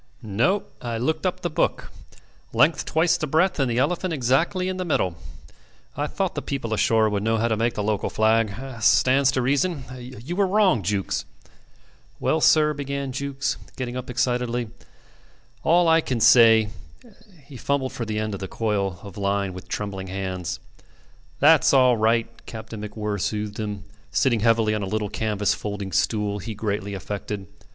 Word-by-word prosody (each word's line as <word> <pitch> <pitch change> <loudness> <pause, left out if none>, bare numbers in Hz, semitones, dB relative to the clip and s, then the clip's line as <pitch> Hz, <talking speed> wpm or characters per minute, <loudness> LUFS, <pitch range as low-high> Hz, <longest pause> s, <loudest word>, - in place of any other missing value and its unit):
"No. 120 - +1 0.2
I 120 -1 -3
looked 130 +8 0
up - - -3
the - - -1
book. - - -1 0.6
Length 155 +2 +3
twice 160 +2 +2
the 155 - -3
breadth 165 +4 +2
and 135 -2 +2
the 120 - -1
elephant 170 +7 0
exactly 150 +8 +1
in 185 0 -2
the 185 - -2
middle. 95 - 0 0.8
I - - -1
thought - - -2
the - - -3
people 125 -5 -3
ashore 110 0 +3
would 105 -1 -1
know 115 +2 +1
how 115 +2 +1
to 110 - +1
make 115 +1 0
the 105 - -2
local 105 -1 -1
flag. 110 0 +2 0.3
Stands 130 +5 +4
to 130 - 0
reason. 140 +3 0
You 125 +5 -7
were 200 0 +2
wrong, 190 - +3
Jukes... 95 +1 -2 0.5
." - - -32
"Well, - - +1
sir," 150 -1 +5
began 140 -1 -4
Jukes, 140 +1 -2 0.2
getting 125 -1 -4
up 125 0 -5
excitedly, 125 -2 -1 0.9
"all 170 +1 +4
I 165 0 +5
can 125 -6 -2
say 115 -2 +6 0.4
" 195 - -22
He 140 -1 -13
fumbled 135 +1 -1
for 120 - -4
the 110 -1 -3
end 110 -1 -2
of 100 - -5
the 95 - -5
coil 100 -5 -1
of 100 -2 -10
line 100 -1 -1
with 90 - -10
trembling 100 -2 -4
hands. 95 -2 -4 0.8
"That's 150 -1 +5
all 130 -2 +5
right." 115 +1 +2 0.2
Captain 110 -1 -8
MacWhirr 105 -1 -4
soothed 105 +1 -3
him, 105 -2 -4 0.3
sitting 120 -4 +2
heavily 115 -1 +3
on 105 - -1
a 100 - -3
little 105 +1 -2
canvas 105 -2 0
folding 100 -2 -5
stool 105 +1 0
he 110 +3 -6
greatly 100 -1 -3
affected. 100 +1 -5
115 Hz, 175 wpm, -24 LUFS, 105-140 Hz, 0.9 s, say